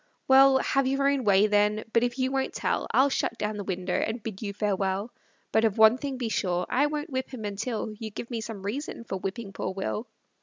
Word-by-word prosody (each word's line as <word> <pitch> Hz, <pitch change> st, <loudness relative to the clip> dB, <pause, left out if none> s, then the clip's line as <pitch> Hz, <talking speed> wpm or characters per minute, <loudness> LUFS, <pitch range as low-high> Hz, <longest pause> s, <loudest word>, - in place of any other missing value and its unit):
Well, 270 Hz, 0 st, +7 dB
have 270 Hz, 0 st, +1 dB
your 275 Hz, +1 st, +1 dB
own 280 Hz, -2 st, +1 dB
way, 200 Hz, 0 st, +5 dB
then; 210 Hz, 0 st, +2 dB
but 230 Hz, -, +4 dB
if 245 Hz, +1 st, -1 dB
you 260 Hz, 0 st, 0 dB
won't 270 Hz, -1 st, -1 dB
tell, -, -, -1 dB
I'll 270 Hz, +1 st, +4 dB
shut 230 Hz, -, -1 dB
down 210 Hz, 0 st, -2 dB
the 205 Hz, -, -4 dB
window, 185 Hz, -1 st, -3 dB
and 225 Hz, 0 st, -1 dB
bid 215 Hz, -4 st, -6 dB
you 205 Hz, -2 st, -3 dB
farewell; 200 Hz, +1 st, -1 dB, 0.4 s
But 220 Hz, -, +3 dB
of 220 Hz, -2 st, +1 dB
one 220 Hz, +3 st, +6 dB
thing 275 Hz, -1 st, -4 dB
be 245 Hz, -2 st, -2 dB
sure, 180 Hz, -5 st, 0 dB
I 280 Hz, +4 st, +3 dB
won't 295 Hz, 0 st, -4 dB
whip 260 Hz, 0 st, -2 dB
him 235 Hz, -5 st, -6 dB
until 215 Hz, +2 st, -3 dB
You 220 Hz, -, -5 dB
give 235 Hz, +4 st, -8 dB
me 230 Hz, -2 st, -2 dB
some 215 Hz, -3 st, -7 dB
reason 235 Hz, +4 st, -4 dB
for 195 Hz, -, -4 dB
whipping 195 Hz, +2 st, -5 dB
poor 185 Hz, -, -3 dB
Will. 210 Hz, +4 st, -3 dB
225 Hz, 230 wpm, -27 LUFS, 205-260 Hz, 0.4 s, Well